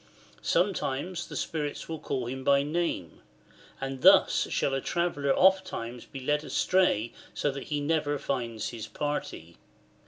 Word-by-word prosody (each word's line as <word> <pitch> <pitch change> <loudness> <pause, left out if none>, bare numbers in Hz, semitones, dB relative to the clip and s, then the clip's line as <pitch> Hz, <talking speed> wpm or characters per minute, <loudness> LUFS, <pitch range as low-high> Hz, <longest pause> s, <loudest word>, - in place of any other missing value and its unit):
Sometimes 175 -2 0
the - - -8
spirits 150 -3 -3
will 160 -1 -5
call 130 -4 -3
him 130 +2 -5
by 140 +1 +4
name; 150 - -2 0.6
and 135 -1 -4
thus - - +6
shall 135 - 0
a 135 - 0
traveller 160 -5 0
ofttimes 180 -11 +2
be 135 - -8
led 150 +3 +1
astray 155 - +2 0.2
so 145 - 0
that 135 -1 -7
he 150 -1 -2
never 145 -1 0
finds 120 -6 -3
his 110 -2 -7
party. 145 - -4
145 Hz, 145 wpm, -28 LUFS, 130-160 Hz, 0.6 s, thus